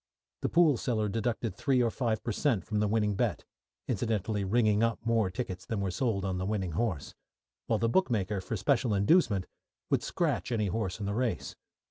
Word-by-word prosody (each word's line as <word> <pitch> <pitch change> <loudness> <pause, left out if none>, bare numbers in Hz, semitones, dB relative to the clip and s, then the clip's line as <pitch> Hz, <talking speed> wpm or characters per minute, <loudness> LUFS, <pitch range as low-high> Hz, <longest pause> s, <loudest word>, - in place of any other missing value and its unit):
The - - 0
pool 165 -6 +4
seller 110 -4 0
deducted 115 -1 -2
three 135 +2 +1
or 120 -2 +2
five 115 -4 -1
per 120 - -2
cent. 110 - 0
from 105 -1 -1
the 105 - +2
winning 105 -1 +1
bet 95 - -1 0.4
(incidentally 110 -2 -1
"ringing 105 +1 +2
up" 115 0 +2
more 115 -4 +2
tickets 95 -1 -5
than 110 - -3
were 100 -2 -1
sold 100 -2 -1
on 95 -1 -1
the 95 - -2
winning 100 -4 -1
horse), 95 -5 -2 0.5
while 110 - +2
the 115 - +1
bookmaker, 110 - +1
for 110 +4 -3
special 115 +2 +1
inducement, 100 - +3 0.5
would - - +3
scratch - - -1
any 105 -4 +1
horse 95 0 -2
in 105 - -3
the 100 - -1
race. 120 0 -2
110 Hz, 190 wpm, -30 LUFS, 100-115 Hz, 0.5 s, pool